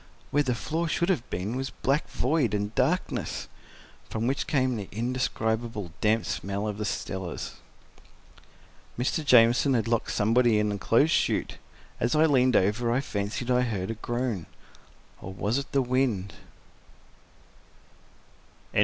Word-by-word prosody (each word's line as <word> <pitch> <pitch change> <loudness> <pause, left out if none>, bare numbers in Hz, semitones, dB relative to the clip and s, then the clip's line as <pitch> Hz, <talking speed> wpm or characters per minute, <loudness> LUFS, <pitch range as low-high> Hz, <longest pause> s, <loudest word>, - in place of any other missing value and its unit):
Where 145 - +3
the 130 -4 0
floor 160 +9 -2
should 170 +3 0
have 165 -11 0
been 100 +7 -3
was 135 +1 -2
black 140 +4 -1
void 130 -6 +1
and 105 +1 -2
darkness, - - -1 0.6
from 110 +1 -2
which 135 +3 -1
came 130 -4 +1
the 100 -4 -6
indescribable, 115 -4 -2
damp 110 +1 +2
smell 100 +2 -3
of 105 0 -4
the 105 - -2
cellars. 95 -3 -4 1.4
Mr. 130 +6 0
Jamieson 125 +1 +5
had 115 -1 0
locked 115 -1 0
somebody 115 +2 +3
in 105 0 +1
the 100 -1 -3
clothes 130 +11 +3
chute. - - 0 0.4
As 120 +5 +1
I 155 +1 +5
leaned 130 -5 +3
over 105 +5 +2
I 125 - +2
fancied 110 0 -3
I 125 0 +4
heard 105 -5 -2
a - - -2
groan—or 115 -4 -7
was 105 +7 0
it 140 - -7
the 135 -1 +2
wind? 125 -6 0
115 Hz, 140 wpm, -27 LUFS, 105-130 Hz, 1.4 s, Jamieson